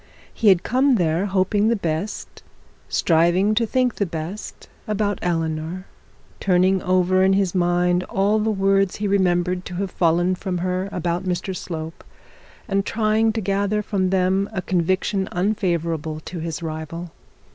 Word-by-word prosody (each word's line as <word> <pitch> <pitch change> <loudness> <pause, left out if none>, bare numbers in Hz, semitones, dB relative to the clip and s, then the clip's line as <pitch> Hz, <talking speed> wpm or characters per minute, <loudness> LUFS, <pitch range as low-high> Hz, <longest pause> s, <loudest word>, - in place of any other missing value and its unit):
He 225 - 0
had 185 -3 +6
come 260 +2 +3
there 175 0 +1
hoping 195 +2 +1
the 230 - +3
best, 175 +1 -4 0.5
striving 175 +5 +3
to 230 +1 +1
think 255 0 +1
the 200 - +1
best 165 +5 -7 0.2
about 205 -2 -1
Eleanor; 165 +1 -2 0.5
turning 185 0 +2
over 185 0 +2
in 190 0 +4
his 195 -2 +1
mind 175 0 +2
all 205 +3 +1
the 215 +1 0
words 195 -2 +2
he 205 - -2
remembered 180 -2 +1
to 180 - -7
have 190 0 -3
fallen 175 +2 +2
from 185 0 -3
her 185 +2 -2
about 175 +1 -2
Mr 185 +1 -2
Slope, 160 -2 -6 0.6
and 195 0 +1
trying 220 +1 +1
to 225 - -2
gather 200 +2 0
from 190 -3 0
them 190 +1 +1
a 185 - -3
conviction 185 +3 0
unfavourable 170 -5 -1
to 175 +2 -7
his 165 0 -4
rival. 160 +2 -6
185 Hz, 150 wpm, -22 LUFS, 175-200 Hz, 0.6 s, had